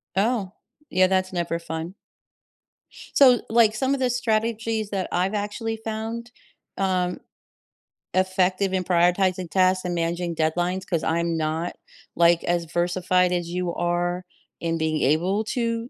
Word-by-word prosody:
Oh, 205 -2 0 0.4
yeah, 185 +1 +4
that's 185 0 0
never 170 -1 -1
fun. 165 +3 -6 1.2
So, 255 -4 +6
like 225 -2 +4
some 265 +3 +1
of 275 - -1
the 255 -1 +1
strategies 225 -2 -1
that 190 -2 -2
I've 185 +4 0
actually 220 +2 -3
found, 225 +2 -5 0.5
um, 185 -2 0 0.9
effective 185 +1 +1
in 185 -1 0
prioritizing 180 0 +2
tasks 185 0 +2
and 175 -1 -1
managing 170 0 -2
deadlines, 175 +4 0
‘cause 170 -4 -1
I'm 170 +1 0
not 160 +2 -2 0.4
like 170 0 +4
as 170 -1 0
versified 180 +2 +1
as 175 -1 -1
you 180 -1 -2
are 175 +1 -1 0.4
in 165 -1 -1
being 160 -1 -1
able 180 +9 +2
to 230 0 -2
185 Hz, 135 wpm, -24 LUFS, 175-215 Hz, 1.2 s, So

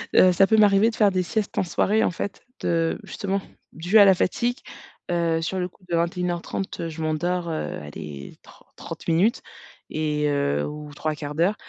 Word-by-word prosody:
Heu, 185 - +7
ça 180 +2 +5
peut 220 +2 +3
m'arriver 210 +2 +5
de - - -9
faire 210 -2 +4
des 185 -1 0
siestes 210 +4 -3
en - - +3
soirée, 210 +4 +1
en - - +2
fait, 195 +3 -5 0.2
de 165 -1 0
justement, 200 -2 -3 0.3
dues 175 +7 +2
à 205 - +9
la 195 - +7
fatigue. 240 +7 0 0.5
Heu, 170 -2 +1
sur 170 +4 -2
le 180 - -1
coup, 185 - -24
de 170 - +1
21:30, 175 +2 -2
heu, 165 - -3
je 160 0 -7
m'endors, 170 +3 -1
heu, 160 - -3
allez, 75 -1 -9
tr - - -18
trente - - -9
minutes 180 +8 +2 0.5
et, 150 -1 -1
heu, 75 - 0
ou 150 0 -8
3/4 155 +5 -1
175 Hz, 185 wpm, -24 LUFS, 155-195 Hz, 0.5 s, à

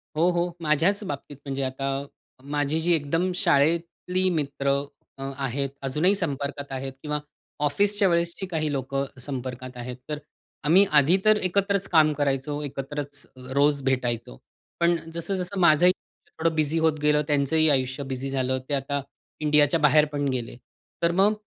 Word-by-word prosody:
हो, 165 +3 +3
हो. 175 0 0
माझ्याच 165 +7 +2
बाबतीत 145 -4 -6
म्हणजे 135 0 -2
आता 135 +1 -2 0.4
माझी 145 +2 -1
जी 175 +2 +3
एकदम 165 +4 +1
शाळेतली 170 +4 +2
मित्र 140 -4 -1 0.5
अ, - - -5
आहेत. 135 0 -2
अजूनही 150 +9 +2
संपर्कात 140 -5 -2
आहेत 135 0 -4
किंवा 150 -1 -2 0.5
ऑफिसच्या 200 +7 +2
वेळेसची 170 +2 0
काही 155 -4 -1
लोकं 135 0 -2
संपर्कात 130 -1 -6
आहेत. 125 +1 -5
तर 150 - -2 0.5
आम्ही 180 +7 +6
आधी 155 +7 +4
तर 215 0 +6
एकत्रच 195 +1 +1
काम 155 -3 +5
करायचो. 145 0 -1
एकत्रच 145 +1 -5 0.3
रोज 145 0 +3
भेटायचो. 120 - -1 0.4
पण 170 0 +3 0.2
जसं-जसं 180 +3 -3
माझंही 175 +1 +6 0.5
थोडं 165 0 +1
बिझी 155 +1 +1
होत 160 -1 +2
गेलं, 150 0 +3
त्यांचंही 150 +2 +3
आयुष्य 130 0 +1
बिझी 130 +1 -3
झालं, 130 -1 0
ते - - -1
आता 140 +1 -1 0.4
इंडियाच्या 150 +1 +3
बाहेर 150 0 +5
पण 145 -1 -1
गेले. 125 -3 -3 0.5
तर 170 - +4
मग 195 +4 +4
150 Hz, 145 wpm, -25 LUFS, 135-170 Hz, 0.5 s, आम्ही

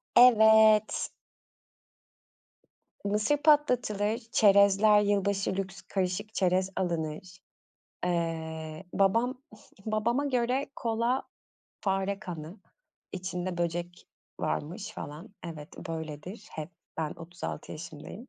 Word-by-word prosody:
Evet. 220 -3 +6 2.0
Mısır 210 +8 +2
patlatılır, 250 -8 +3
çerezler, 200 0 +6
yılbaşı 200 -1 +1
lüks, 195 0 -4
karışık 195 +3 -2
çerez 185 -1 +2
alınır. 170 0 -3 0.7
Eee, 160 -2 -2
babam, 230 +7 +2 0.4
babama 230 +6 +1
göre 255 0 +1
kola, 235 +3 0 0.6
fare 195 0 0
kanı, 170 -1 -7 0.5
içinde 185 -1 -4
böcek 175 +1 -3 0.3
varmış, 170 - -3
falan 150 +7 -7 0.2
evet 155 -3 -7 0.2
böyledir, 160 +4 -6
hep, 155 0 -6 0.3
ben 155 -2 -2
36 170 +1 -7
yaşındayım 170 - -9
195 Hz, 85 wpm, -29 LUFS, 170-220 Hz, 2.0 s, Evet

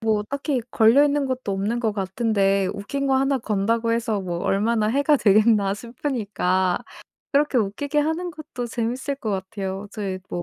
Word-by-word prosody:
뭐 220 -2 +1
딱히 280 +2 -2
걸려 230 +6 +5
있는 290 -1 +1
것도 255 -5 -3
없는 205 +5 -1
것 220 -3 0
같은데 195 -1 +1
'웃긴 275 +8 -3
거 265 - +3
하나 270 0 +2
건다고 225 +1 0
해서 225 -3 0
뭐 175 -2 -4
얼마나 210 +4 +1
해가 285 +5 +3
되겠나.' 210 -3 +4
싶으니까 205 -6 -1 0.5
그렇게 285 -2 +3
웃기게 275 +8 -1
하는 320 +4 0
것도 295 -6 -7
재밌을 245 +4 -3
것 225 -5 -4
같아요. 195 0 -4
저의 195 -4 -4
뭐 175 - -4
225 Hz, 335 characters per minute, -23 LUFS, 200-270 Hz, 0.5 s, 걸려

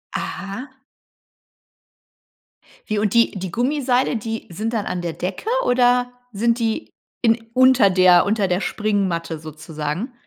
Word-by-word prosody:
Aha. 240 +8 -6 2.1
Wie 215 - 0
und 205 -1 0
die 235 0 +4
die 190 -2 -6
Gummiseile, 255 +1 +1
die 225 0 -4
sind 215 +6 -3
dann 215 -3 -1
an 180 - -3
der 170 - -3
Decke 185 - -4 0.2
oder 245 0 +3 0.2
sind 230 +3 +1
die 230 +5 -2 0.3
in 230 -1 +3 0.2
unter 255 -5 +5
der 185 -1 +5
unter 205 -1 +1
der 180 +1 0
Springmatte 190 -8 -1
sozusagen? 155 - -5
215 Hz, 130 wpm, -21 LUFS, 180-245 Hz, 2.1 s, unter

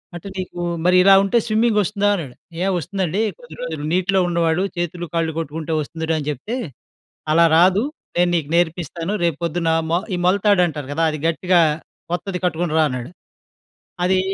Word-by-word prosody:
"అంటే 175 +3 -8
నీకు 185 -1 -5 0.3
మరి 180 0 +4
ఇలా 195 +1 +7
ఉంటే 200 +4 +1
స్విమ్మింగ్ 220 0 +2
వస్తుందా?" 205 +1 0
అన్నాడు 145 -10 -6 0.3
ఏ - - +1
వస్తుందండి 190 +2 -2 0.2
కొద్ది 160 -1 -12
రోజులు 160 -3 -4
నీటిలో 185 +2 +2
ఉండేవాడు 170 +1 +1
చేతులు 175 0 -3
కాళ్ళు 165 -1 +1
కొట్టుకుంటే 160 +1 -4
వస్తుందిరా 160 +2 -3
అని 145 - -6
చెప్తే. 205 - -5 0.8
"అలా 170 +2 +5
రాదు, 185 +6 +4 0.3
నేను 175 0 +3
నీకు 155 -4 -2
నేర్పిస్తాను, 170 +1 -1
రేపు 165 -3 0
పొద్దున 170 0 0 0.2
మొ 170 - +3 0.2
ఈ - - 0
మొలతాడంటారు 180 -6 +2
కదా! 160 +3 -1
అది 155 - -4
గట్టిగా 175 +2 +2 0.5
కొత్తది 180 +1 -2
కట్టుకొని 170 -2 -1
రా 160 - +5
అన్నాడు." 125 +2 -5 0.9
అదీ, 185 +1 +3
175 Hz, 160 wpm, -20 LUFS, 160-185 Hz, 0.9 s, ఇలా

